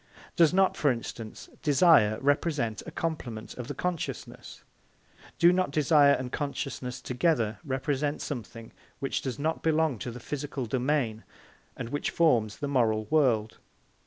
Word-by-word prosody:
Does 165 -3 +5
not, 190 +1 +3
for 145 - +2
instance, 115 -2 -5
desire 140 -8 +5
represent 140 -6 0
a - - -6
complement 125 -10 -4
of 125 -2 -6
the 145 - -5
consciousness? 180 +2 -5 0.7
Do 170 +1 +6
not 185 -2 +1
desire 145 -1 +5
and 130 -2 -3
consciousness 135 -3 -4
together 125 -5 0
represent 145 +1 -1
a - - -6
something 115 -4 -7 0.3
which 135 - -2
does 130 -2 -4
not 160 +3 -1
belong 160 -6 +1
to 125 - -4
the 120 +1 -8
physical 140 0 -4
domain 125 -2 -1 0.5
and 120 -2 -5
which 145 +3 -2
forms 120 -11 +2
the 145 - -3
moral 115 -6 +1
world? 120 -8 +2
135 Hz, 145 wpm, -28 LUFS, 120-155 Hz, 0.7 s, Do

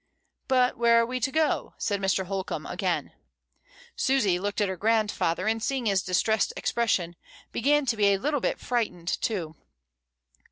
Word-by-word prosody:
"But 255 -1 +2
where 235 0 +5
are 230 - +3
we 255 +2 -3
to 255 +3 -1
go?" 315 +1 0
said 200 -1 -1
Mr. 190 0 +1
Holcombe 190 0 -4
again. - - -2 0.8
Susy 210 -10 +2
looked 205 +2 -3
at 205 - +2
her 190 - -3
grandfather, 210 -4 0
and 225 0 0
seeing 265 0 -1
his 195 -3 +2
distressed 195 +4 +1
expression, 185 -7 0 0.4
began 290 +4 +2
to 235 -3 +1
be 205 -1 +4
a 200 -1 +4
little 290 +7 -1
bit - - -1
frightened 215 -8 -2
too. 170 -8 -2
220 Hz, 160 wpm, -27 LUFS, 195-250 Hz, 0.8 s, where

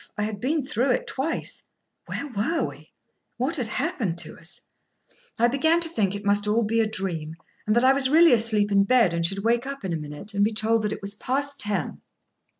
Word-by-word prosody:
I 210 - -1
had 210 -1 -4
been 290 +6 0
through 270 -1 -1
it - - -2
twice. 275 +5 -3 0.5
Where - - -4
were 250 +9 -1
we? - - -13 0.5
What 270 +7 0
had 245 -5 -1
happened 225 - -2
to 170 -2 -3
us? 170 +1 -7 0.8
I 235 - +4
began 315 +7 +2
to 335 -1 +2
think 205 - -1
it 205 0 -7
must 205 +1 +2
be - - -1
all 225 +1 +2 0.2
a 220 - +1
dream, 170 -7 -3 0.3
and 215 - +2
that 240 - +3
I 260 +1 +6
was 270 -1 +3
really 325 +2 +6
asleep 215 -3 +3
in 200 0 +4
bed, 230 -5 +3
and 170 0 -1
should 195 +3 0
wake 235 +3 +1
up 275 -6 -6
in 180 - -2
a - - -1
minute, 150 +7 -6
and 200 0 +2
be 220 +2 +1
told 215 0 +1
it - - -5
was 200 0 -2
past 280 +6 -3
ten. 205 - -2
220 Hz, 220 wpm, -25 LUFS, 200-265 Hz, 0.8 s, I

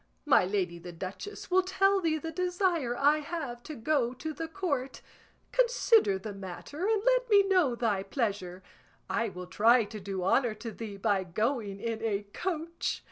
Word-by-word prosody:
My 280 -10 +5
lady 185 -3 -1
the 175 +1 -8
duchess 190 - -7
will 375 +1 +5
tell 390 +1 +2
thee 320 -2 +1
the 325 +2 -5
desire 355 -7 0
I 295 +2 +4
have 290 -6 -5
to 305 +4 -8
go 255 -1 0
to 315 +5 -5
the 325 +2 -5
Court; 305 -8 -3 0.5
consider 475 - +4
the 205 +2 -7
matter 195 - -5
and 435 -2 +1
let - - +3
me 405 -2 +7
know 360 -11 +3
thy 225 -5 0
pleasure; 195 -4 -3 0.5
I 230 -1 0
will 180 -1 -8
try 230 +6 +4
to 215 +1 -8
do 190 -1 -4
honour 230 +4 +2
to 225 +2 -7
thee 215 -2 -7
by 195 -1 +1
going 210 +2 -2
in 225 0 -3
a 210 -3 -1
coach. 335 -2 -3
245 Hz, 175 wpm, -30 LUFS, 200-340 Hz, 0.5 s, me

